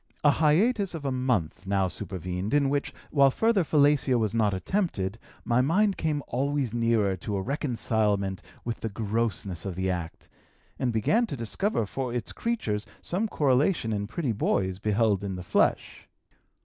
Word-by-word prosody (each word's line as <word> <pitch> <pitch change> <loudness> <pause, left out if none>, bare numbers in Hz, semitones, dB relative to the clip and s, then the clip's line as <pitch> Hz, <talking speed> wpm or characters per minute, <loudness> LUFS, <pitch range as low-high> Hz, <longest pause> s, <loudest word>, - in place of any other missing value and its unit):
A 145 - +6
hiatus 190 - +2
of 150 -3 -6
a 135 - 0
month 105 -9 -1
now 95 -1 +2
supervened, 90 - -4
in 140 -2 +3
which, 145 0 -1 0.2
while 140 -2 +5
further 220 - +2
fellatio 145 -3 +3
was 110 -3 0
not 110 -3 +2
attempted, 105 - -1 0.3
my 120 +1 +3
mind 190 +9 +2
came 150 -3 -1
always 135 -1 -1
nearer 115 -4 +2
to 100 +3 -4
a 95 - -1
reconcilement 110 - 0 0.2
with 115 -1 -3
the 115 - -3
grossness 105 -4 -2
of 95 -3 -4
the 95 +1 0
act, 85 -2 -5 0.5
and 130 -2 +1
began 210 - +2
to 140 - -5
discover 115 - -1
for 130 +4 -4
its 120 -3 -3
creatures 110 - -2 0.2
some 200 +6 -1
correlation 140 - +2
in 100 -1 -2
pretty 135 +2 -2
boys 95 -3 0
beheld 105 -1 +1
in 95 -2 -3
the 90 - -6
flesh. - - 0
115 Hz, 160 wpm, -27 LUFS, 100-145 Hz, 0.5 s, A